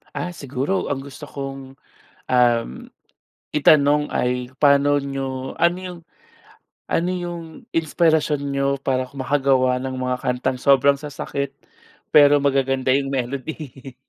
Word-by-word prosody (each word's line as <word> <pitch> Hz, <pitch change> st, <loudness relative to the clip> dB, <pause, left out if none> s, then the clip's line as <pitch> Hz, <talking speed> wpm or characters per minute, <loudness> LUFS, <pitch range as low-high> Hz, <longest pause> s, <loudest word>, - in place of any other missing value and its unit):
Ah, 175 Hz, -, -3 dB
siguro 140 Hz, +3 st, -2 dB
ang 135 Hz, -, -5 dB
gusto 140 Hz, +2 st, -10 dB
kong, 135 Hz, -2 st, -7 dB, 0.6 s
uhm, 120 Hz, -, +1 dB, 0.6 s
itanong 150 Hz, 0 st, +4 dB
ay, 125 Hz, 0 st, -1 dB
"Paano 145 Hz, 0 st, +4 dB
niyo, 135 Hz, -1 st, -5 dB
ano 170 Hz, +1 st, +2 dB
'yung 180 Hz, -2 st, -7 dB, 0.9 s
ano 175 Hz, +2 st, +1 dB
'yung 175 Hz, -2 st, -4 dB, 0.3 s
inspirasyon 160 Hz, -2 st, +1 dB
niyo 140 Hz, 0 st, -1 dB
para 130 Hz, -1 st, -1 dB
ku 140 Hz, -, -15 dB
makagawa 130 Hz, -2 st, +2 dB
ng 130 Hz, 0 st, -4 dB
mga 125 Hz, 0 st, -1 dB
kantang 125 Hz, 0 st, -1 dB
sobrang 140 Hz, 0 st, +5 dB
sasakit, 140 Hz, -1 st, -5 dB, 0.6 s
pero 145 Hz, -1 st, +7 dB
magaganda 135 Hz, -2 st, +1 dB
'yung 135 Hz, 0 st, 0 dB
melody. 135 Hz, 0 st, -5 dB
140 Hz, 120 wpm, -22 LUFS, 130-145 Hz, 0.9 s, pero